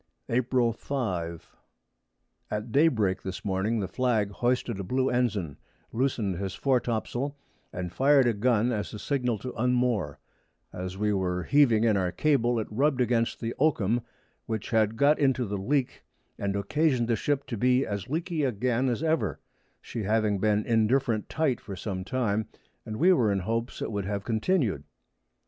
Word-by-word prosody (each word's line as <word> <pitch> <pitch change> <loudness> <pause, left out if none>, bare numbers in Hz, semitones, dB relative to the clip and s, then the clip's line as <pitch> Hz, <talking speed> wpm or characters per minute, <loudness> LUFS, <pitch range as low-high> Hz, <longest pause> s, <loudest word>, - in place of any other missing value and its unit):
April 120 -1 +2
5. 90 - -4 0.9
At 105 +2 -4
Day 145 +7 +5
break 105 -10 0
this 95 +1 -6
Morning 105 +3 0
the 95 - -2
Flag 110 -1 0
hoisted 120 -1 -1
a - - -3
blue 130 +7 0
Ensign, 105 - -1 0.4
loos'd 115 -7 0
his 95 -1 -3
Fore 135 -2 +2
top 115 -2 -2
sail, 140 +4 -3 0.3
and 90 -1 -5
fired 140 0 +4
a 120 - +3
Gun 115 +2 +2
as 105 -1 -3
a - - -5
Signal 125 -1 -1
to 125 +5 -6
unmoor: 120 - 0 0.6
As 90 +1 -5
we 105 +1 +1
were 90 -2 -1
heaving 130 -7 +4
in 110 -3 +3
our 90 -2 0
Cable, 120 -2 +2
it 110 - -2
rubb'd 135 +4 +1
against 115 -1 +1
the 115 0 -2
Oakham, 120 -6 +2 0.5
which 110 -2 -4
had 110 -1 +2
got 145 +4 +4
into 135 -3 +2
the 100 -1 -3
Leak, 130 +5 -1 0.4
and 100 0 -1
occasion'd 125 +4 +1
the 115 - +2
Ship 140 +5 -1
to 120 - -4
be 125 +4 +2
as 100 +2 -4
leaky 165 +1 -1
again 125 +1 +1
as 120 +5 -2
ever, 160 0 0 0.4
she 115 - -5
having 105 -1 +1
been 105 +1 +1
indifferent 115 0 +1
tight 155 -6 0
for 100 - -7
some 95 -1 -4
time, 110 -1 -1 0.4
and 110 - -4
we 185 +7 +5
were 115 - +2
in 100 -1 0
hopes 115 +5 -3
it - - -3
would 100 -2 -2
have 100 0 -3
continu'd. 110 - 0
115 Hz, 170 wpm, -27 LUFS, 100-130 Hz, 0.9 s, Day